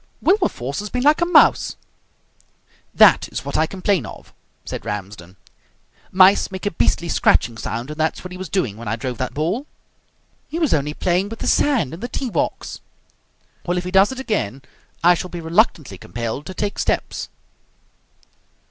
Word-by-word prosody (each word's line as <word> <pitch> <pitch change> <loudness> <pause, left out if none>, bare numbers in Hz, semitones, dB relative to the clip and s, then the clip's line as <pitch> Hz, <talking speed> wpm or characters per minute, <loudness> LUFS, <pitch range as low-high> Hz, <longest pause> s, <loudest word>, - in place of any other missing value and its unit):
"Wilberforce 340 - 0
has 210 0 -5
been 250 +3 -2
like 300 +4 +4
a 345 - +2
mouse!" 355 - +4 1.2
"That - - +5
is - - -5
what - - -4
I 160 - +2
complain 190 0 0
of," - - -12 0.3
said - - -6
Ramsden. 95 -3 -6 0.8
"Mice 190 +2 +5
make 190 0 -7
a 205 - 0
beastly 170 +1 +1
scratching 120 -7 +2
sound, 120 +4 -5
and 150 - -9
that's 160 0 -1
what 180 - -8
he 180 - -7
was 185 -3 -6
doing 125 - -1
when 115 -1 -8
I 105 - 0
drove 125 0 -5
that 130 - -3
ball." 180 - -1 0.8
"He 325 - -4
was 320 -4 +1
only 150 0 0
playing 185 +2 0
with 225 - -7
the - - -5
sand 245 - +2
in 165 - -7
the 240 - -4
tee 250 -1 -4
box." - - -2 0.9
"Well, 175 +1 0
if 180 - -1
he 180 - -5
does 195 +3 +5
it 265 - -6
again, 140 - -2 0.4
I 175 +1 +7
shall 180 +1 -4
be 175 - -6
reluctantly 160 - +1
compelled 120 - -5
to 185 - -7
take 205 -1 -3
steps." - - -2
175 Hz, 180 wpm, -21 LUFS, 130-205 Hz, 1.2 s, I